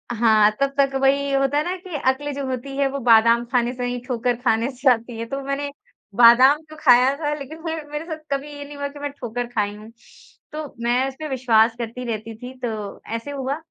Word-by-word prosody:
हाँ, 215 -2 +5
तब 275 0 +1
तक 275 -1 +3
वही 280 +1 +2
होता 275 +1 +2
है 300 - +2
ना 355 +3 -2
कि 360 -3 -9
अक्ल 290 +2 -2
जो 275 0 -4
होती 260 +1 -5
है 280 -1 +2
वो 280 - -4
बादाम 230 +1 +6
खाने 240 0 0
से 250 - -5
नहीं 245 0 -2
ठोकर 245 -1 -1
खाने 230 0 +1
से 260 +1 +2
आती 230 -1 -2
है। 230 - -4
तो 275 - -3
मैंने 275 +1 -2 0.5
बादाम 250 +5 +7
तो 310 - -11
खाया 255 +1 +5
था 295 -2 -1
लेकिन 305 +4 -9
मैं 325 -1 -2 0.2
मेरे 295 +2 -4
साथ 315 -2 -5
कभी 280 +2 -2
ये 285 - -7
नहीं 290 0 -10
हुआ 285 0 -2
कि 290 +1 -12
मैं 290 0 -3
ठोकर 245 -2 -4
खाई 210 -4 -2
हूँ। 215 +2 -12 0.6
तो 310 +1 -5 0.2
मैं 245 +3 +2
उसपे 270 +3 -6
विश्वास 230 -3 +3
करती 235 +2 -5
रहती 220 +1 -5
थी 250 +2 -9
तो 215 -5 -5
ऐसे 260 +5 -5
हुआ 275 0 -3
260 Hz, 225 wpm, -22 LUFS, 235-280 Hz, 0.6 s, बादाम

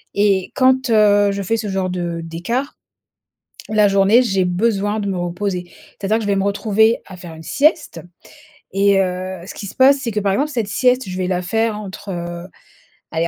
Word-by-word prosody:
et 200 -2 +1
quand, 260 -1 +3
heu, 205 -2 +4
je 200 0 -3
fais 225 +4 0
ce 215 -1 -4
genre 190 -1 -1
de 170 -2 -3
d'écart, 185 - -4 0.9
la 215 -1 +3
journée, 200 +4 +4
j'ai 195 -5 +1
besoin 205 +2 0
de 200 - -3
me 190 - -2
reposer. 175 0 -3 0.3
C'est-à-dire 205 +2 +1
que - - -4
je - - -3
vais 200 - +2
me 195 - +1
retrouver 215 +2 +2
à 185 - -11
faire 175 -2 -10
une 160 - -11
sieste 300 - +1 0.7
et 200 0 +3
heu, 185 0 -3
ce - - -7
qui 200 - -7
se - - -10
passe, 275 +2 +5
c'est 235 -4 -3
que 210 - -1
par 195 -1 +1
exemple 295 +7 0
cette 230 -6 -2
sieste, 250 +1 +1
je 185 - -5
vais 185 -1 -1
la 180 -1 -1
faire 220 +2 -1
entre, 200 0 -9
heu, 175 0 -6 0.6
allez 165 +1 0
200 Hz, 205 wpm, -19 LUFS, 185-220 Hz, 0.9 s, passe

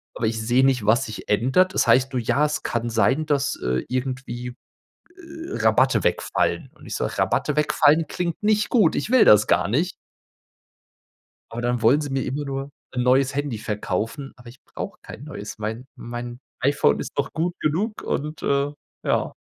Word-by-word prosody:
Aber 115 - -2
ich 110 0 -2
sehe 120 +4 +2
nicht, 125 -6 +2
was 110 +3 +3
sich 110 - -8
ändert. 135 - +3
Es - - +1
heißt 130 +3 +4
nur, 125 - 0
ja, 140 +6 +2
es 150 - -2
kann 120 0 -2
sein, 125 +7 +2
dass, 145 -1 0
äh, 65 +1 -1
irgendwie, 125 -1 -4 0.6
äh, 330 -1 -10
Rabatte - - +3
wegfallen. - - 0
Und - - -16
ich - - -5
sage: - - -3
"Rabatte 150 - 0
wegfallen 150 +1 +3
klingt 170 0 -3
nicht 210 0 +2
gut, 230 -5 +3
ich - - -2
will 255 -2 +6
das 105 0 +6
gar - - +2
nicht." 160 - 0 1.6
Aber 115 +1 -5
dann 120 -1 -1
wollen 120 +6 +5
sie 145 - -4
mir 135 -1 0
immer 145 +3 -3
nur 135 0 -4 0.3
'n 125 - 0
neues 130 +2 +3
Handy 145 -5 -2
verkaufen, 105 +6 -3
aber 120 -2 -14
ich 130 - -17
brauche - - -7
kein 130 - -10
neues. 110 -9 -8
Mein 110 +4 -5
mein 120 0 -7 0.2
iPhone 135 - +2
ist - - -5
noch - - -1
gut 170 +2 -1
genug 195 +9 -1
und, 150 +2 -3
äh, 140 +1 +1 0.3
ja. - - 0
135 Hz, 180 wpm, -23 LUFS, 120-150 Hz, 1.6 s, will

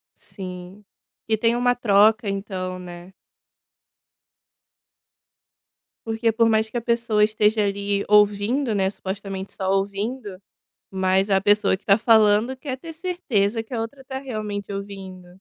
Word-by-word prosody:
Sim, 185 +1 -10 0.4
que 220 -1 +1
tem 230 +2 +2
uma 245 0 +2
troca, 215 -1 +3
então, 190 -2 -4
né. 175 +1 -11 2.9
Porque 225 0 0
por 230 0 +3
mais 220 0 +2
que 220 - -17
a - - -2
pessoa 235 -2 +1
esteja 215 0 +2
ali 200 0 -1
ouvindo, 210 +4 +3
né, 190 -1 +1
supostamente 195 0 -6
só 190 -1 -3
ouvindo, 200 +2 -2 0.5
mas 190 +1 +1
a 195 -1 +3
pessoa 205 0 +3
que 190 - -17
tá 200 0 +5
falando 220 +1 +4
quer 260 0 -6
ter 325 +4 -9
certeza 260 - -1
que 225 +3 -12
a 225 - -1
outra 270 +5 -7
tá 265 -1 -5
realmente 215 -6 -5
ouvindo. 195 -2 -8
210 Hz, 135 wpm, -23 LUFS, 195-230 Hz, 2.9 s, tá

